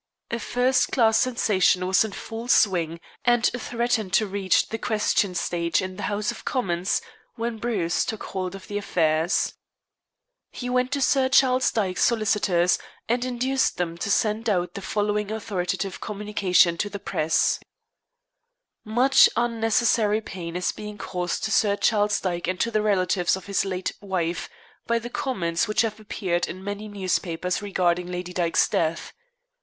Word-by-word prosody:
A 235 - -1
first 250 +2 +1
class 225 -3 +3
sensation 205 -7 +2
was 190 +3 +4
in 220 - -4
full 225 +4 -7
swing 170 -8 +2 0.2
and 240 -1 +3
threatened 235 -5 -1
to 215 - +4
reach 195 -2 +1
the 225 - -4
question 210 -4 +1
stage 170 -1 0
in 185 0 -4
the - - -7
House 210 +3 -1
of 235 - -10
Commons 185 -7 -1 0.3
when 230 -1 -3
Bruce 205 -8 0
took 220 - -4
hold 185 -1 -4
of 195 - -11
affairs. 170 -4 +1 1.0
He 250 0 -5
went 250 +1 +1
to 280 - -1
Sir 265 -1 +3
Charles 260 -1 +4
Dyke's 190 -5 0
solicitors, 210 -6 +2 0.3
and 240 +2 +1
induced 255 +2 0
them 170 -2 -2
to - - -3
send 220 +3 +1
out 180 -3 0
the 200 - -6
following 210 +1 -1
authoritative 195 -3 -3
communication 195 -4 +2
to 205 - -1
the 200 - -5
press: 160 -4 +1 1.2
"Much 245 +5 +5
unnecessary 225 -2 +2
pain 175 -5 -7
is 180 0 0
being 210 0 -8
caused 180 -2 -3
to 220 - -1
Sir 205 -2 +3
Charles 210 -1 +2
Dyke 175 -2 -3
and 185 0 -2
to 230 - 0
the 215 -1 +1
relatives 185 -4 +2
of 190 - -9
his 200 0 0
late 185 -1 -2
wife 180 -4 -2 0.4
by 235 - +2
the 235 +1 -6
comments 175 -13 -1
which 215 - +2
have 220 -2 -2
appeared 185 -4 -2
in 185 +1 -8
many 205 +1 -5
newspapers 180 -3 -2
regarding 180 -3 0
Lady 180 0 -5
Dyke's 170 -2 +2
death. 165 0 -1
205 Hz, 155 wpm, -24 LUFS, 180-225 Hz, 1.2 s, Much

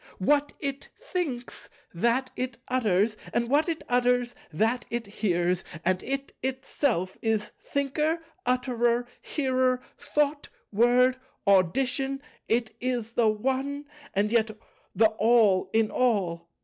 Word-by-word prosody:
What 290 +9 +2
It 275 -1 -4
thinks, 270 -10 -4 0.2
that 235 +8 +1
It 255 -1 -3
utters; 215 -4 +2 0.2
and 235 +1 +1
what 300 +4 +3
It 325 - -3
utters, 245 0 +2 0.2
that 225 +9 +1
It 235 -1 -2
hears; 180 -3 0 0.2
and 185 +1 +2
It 275 +2 -4
itself 255 - -1
is 220 -2 0
Thinker, 300 +4 0 0.2
Utterer, 245 -1 +1 0.2
Hearer, 255 -3 +1 0.2
Thought, 295 0 0 0.2
Word, 245 +4 +4 0.3
Audition; 255 +8 +2 0.3
it 225 -1 0
is 245 -3 -1
the 235 -2 +4
One, 265 +6 -1 0.3
and 205 +2 +2
yet 225 -2 +3 0.5
the 225 - +5
All 210 -4 +4
in 220 -1 +2
All. 180 -9 0
240 Hz, 120 wpm, -27 LUFS, 215-265 Hz, 0.5 s, the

